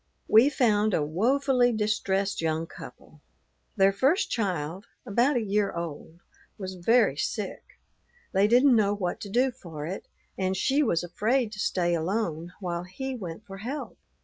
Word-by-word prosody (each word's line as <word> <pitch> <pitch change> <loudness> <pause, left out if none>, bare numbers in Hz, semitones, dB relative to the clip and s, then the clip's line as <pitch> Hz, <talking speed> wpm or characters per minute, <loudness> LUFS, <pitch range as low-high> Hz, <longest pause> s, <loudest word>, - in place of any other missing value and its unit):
We 225 +6 +6
found 215 -7 +2
a 150 - +1
woefully 245 - +2
distressed 200 -3 0
young 160 0 -1
couple. - - -13 0.5
Their 195 -2 +4
first 275 - +2
child, 185 -3 -2 0.2
about 240 +7 +2
a 235 - 0
year 205 0 +1
old, 170 0 -7 0.4
was 190 -2 -5
very 205 - +3
sick. 200 +6 -4 0.5
They 195 +1 +3
didn't 250 +3 +5
know 205 -2 +3
what 180 -3 -3
to 200 - -6
do 250 +5 +2
for 165 -11 -8
it; 185 +5 -6 0.3
and 190 0 0
she 275 +8 +2
was 175 - +1
afraid 220 +7 0
to 210 - -9
stay 175 -4 +1
alone 170 -1 -2
while 175 -2 -3
he 265 +9 -5
went 195 -3 -7
for 195 -2 -9
help. 260 +8 -6
200 Hz, 155 wpm, -27 LUFS, 175-235 Hz, 0.5 s, We